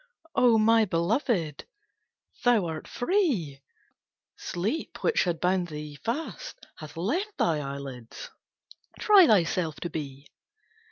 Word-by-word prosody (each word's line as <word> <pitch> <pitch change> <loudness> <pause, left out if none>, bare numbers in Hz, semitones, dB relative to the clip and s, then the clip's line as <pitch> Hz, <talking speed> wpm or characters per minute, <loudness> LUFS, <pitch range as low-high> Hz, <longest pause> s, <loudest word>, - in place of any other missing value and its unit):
"O 240 -3 +4
my 225 +1 +5
belovèd, 175 - 0 0.8
thou 240 -7 +4
art 160 -2 -5
free! 245 - 0 0.7
Sleep 210 - -4
which 470 - +2
had 170 -2 -1
bound 180 0 +1
thee 150 -2 -7
fast, 240 - -5
hath 155 0 -10
left 345 - -2
Thine 155 -3 +1
eyelids. 135 -4 -8 0.7
Try 400 -5 +7
thyself 170 - +2
to 175 - -4
be! 140 -2 -6
180 Hz, 110 wpm, -27 LUFS, 155-240 Hz, 0.8 s, Try